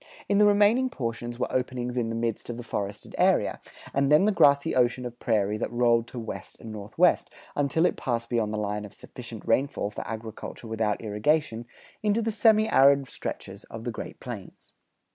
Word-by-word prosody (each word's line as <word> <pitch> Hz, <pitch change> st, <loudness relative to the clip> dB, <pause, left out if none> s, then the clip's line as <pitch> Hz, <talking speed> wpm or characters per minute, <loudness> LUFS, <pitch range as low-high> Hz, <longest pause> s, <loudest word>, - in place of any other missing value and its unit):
In 200 Hz, 0 st, +3 dB
the 210 Hz, -, +7 dB
remaining 210 Hz, +5 st, +4 dB
portions 120 Hz, -, -4 dB
were 125 Hz, -, 0 dB
openings 125 Hz, -1 st, -2 dB
in 120 Hz, -2 st, 0 dB
the 115 Hz, -, -3 dB
midst 115 Hz, 0 st, -2 dB
of 120 Hz, -, -4 dB
the 120 Hz, -, -6 dB
forested 100 Hz, -3 st, -5 dB
area, -, -, +2 dB, 0.3 s
and 140 Hz, +1 st, +2 dB
then 150 Hz, +6 st, +6 dB
the 215 Hz, -, +4 dB
grassy 140 Hz, -7 st, +4 dB
ocean 125 Hz, 0 st, +2 dB
of 120 Hz, 0 st, -7 dB
prairie 105 Hz, -2 st, +1 dB
that -, -, -2 dB
rolled 120 Hz, -1 st, +3 dB
to 125 Hz, -, -10 dB
west 115 Hz, -2 st, -7 dB
and 110 Hz, -, -9 dB
northwest, 110 Hz, -, +1 dB, 0.3 s
until 145 Hz, +4 st, +2 dB
it -, -, +1 dB
passed 115 Hz, -2 st, -2 dB
beyond 115 Hz, -3 st, 0 dB
the 110 Hz, -, -2 dB
line 105 Hz, 0 st, -2 dB
of 105 Hz, -, -10 dB
sufficient -, -, -9 dB
rainfall 135 Hz, -6 st, +1 dB
for -, -, -5 dB
agriculture 110 Hz, +1 st, -7 dB
without 110 Hz, -2 st, -1 dB
irrigation, 115 Hz, +2 st, 0 dB, 0.3 s
into 215 Hz, +2 st, +1 dB
the 225 Hz, -, 0 dB
semi 220 Hz, 0 st, +4 dB
arid 140 Hz, -, +5 dB
stretches 100 Hz, +2 st, -6 dB
of 115 Hz, 0 st, -9 dB
the 120 Hz, -, -2 dB
Great -, -, -8 dB
Plains. 115 Hz, -7 st, -9 dB
120 Hz, 190 wpm, -27 LUFS, 110-140 Hz, 0.3 s, the